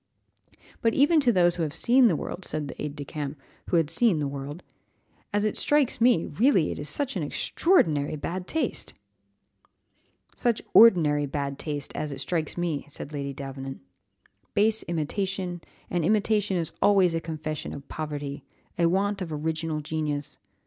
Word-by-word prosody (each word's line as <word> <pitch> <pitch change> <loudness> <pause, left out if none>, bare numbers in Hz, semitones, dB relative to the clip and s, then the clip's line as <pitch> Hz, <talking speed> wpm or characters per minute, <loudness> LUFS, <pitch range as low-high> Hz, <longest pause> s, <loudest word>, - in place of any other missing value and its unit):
"But 230 -1 +2
even 295 +4 +5
to 260 -5 +4
those 175 -4 +3
who - - -2
have 155 -1 -2
seen 245 +8 +5
the 180 - +2
world," 180 - -5
said 155 -4 -3
the - - -8
aide 150 -1 -4
de 145 -1 -6
camp, 150 -1 -5 0.3
who 175 - +3
had 160 -2 +1
seen 205 0 +3
the 145 -2 -1
world, 140 +4 -6 0.7
"as 205 0 +1
it 215 - -1
strikes 290 -6 +2
me, 235 -9 +4
really 190 - +2
it - - -5
is 145 0 -3
such 275 - 0
extraordinary 155 - +1
bad 180 +5 -4
taste!" 320 - -2 1.4
"Such 240 -3 +1
ordinary 155 -10 +6
bad 140 0 -3
taste! 145 -2 -4
as 150 - -3
it 135 - -6
strikes 155 +4 -2
me," 170 -5 -2
said 145 +1 -8
Lady 140 -1 -3
Davenant; 135 -1 -7 0.7
"base 220 +2 +3
imitation, 180 +2 -2 0.3
and 175 -2 -1
imitation 210 +1 +2
is 165 -2 -2
always 195 -4 +4
a 165 - -1
confession 155 -2 -5
of 140 -1 -9
poverty, 145 -2 -5 0.4
a 170 - +4
want 200 +3 0
of 170 -3 -4
original 155 0 -2
genius. 150 -2 -3
165 Hz, 165 wpm, -26 LUFS, 145-200 Hz, 1.4 s, ordinary